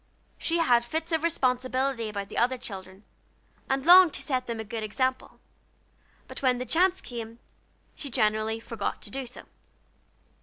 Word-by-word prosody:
She 335 - 0
had 245 -8 +4
fits 320 +7 -3
of 320 -1 +1
responsibility 255 -5 0
about 200 -1 -5
the - - -7
other 255 +2 +2
children, 195 -5 -9 0.7
and 270 +1 0
longed 355 -1 +8
to - - -3
set 260 -3 -1
them 230 -1 -4
a - - -3
good 220 +1 -5
example, 255 +5 -2 0.9
but - - -9
when 255 -2 +3
the 250 - -4
chance 365 +6 +2
came, 230 -2 -7 0.6
she 285 - -8
generally 220 -2 +1
forgot 225 -2 -4
to 205 - -9
do 270 +1 -4
so. 245 - -10
250 Hz, 160 wpm, -27 LUFS, 225-275 Hz, 0.9 s, longed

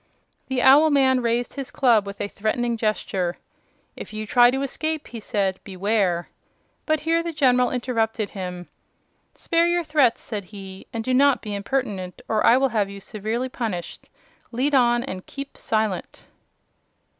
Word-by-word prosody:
The 260 -2 -1
owl 285 +4 +7
man 265 -3 +3
raised 235 +1 0
his 275 -2 -6
club 230 -6 +3
with 200 - -7
a - - -2
threatening 235 +4 -1
gesture. 195 -5 -1 0.6
"If - - -9
you 215 0 -4
try 240 +3 +5
to 270 +2 -1
escape," 310 +3 -2
he 235 - -7
said, 195 -4 -1
"beware 190 -2 0 0.3
" - - -44
But 310 -2 +1
here 330 +2 +1
the 335 0 -4
General 250 -5 +3
interrupted 225 -4 -1
him. 180 -2 -6 0.7
"Spare 335 0 +1
your 345 0 +1
threats," 295 -7 +3
said 205 -4 -6
he, 195 -1 -10
"and 225 -1 -4
do 255 - -1
not 275 +1 +4
be 210 -2 -5
impertinent, 200 -4 -3
or 220 -1 +1
I 240 - +6
will 270 0 +2
have 210 -4 0
you 200 0 -8
severely 220 +5 -3
punished. 220 -9 -5 0.4
Lead 260 +5 0
on, 240 -2 +4
and 185 -8 -7
keep 275 0 -7
silent!" 215 -4 -2
235 Hz, 165 wpm, -23 LUFS, 205-265 Hz, 0.7 s, owl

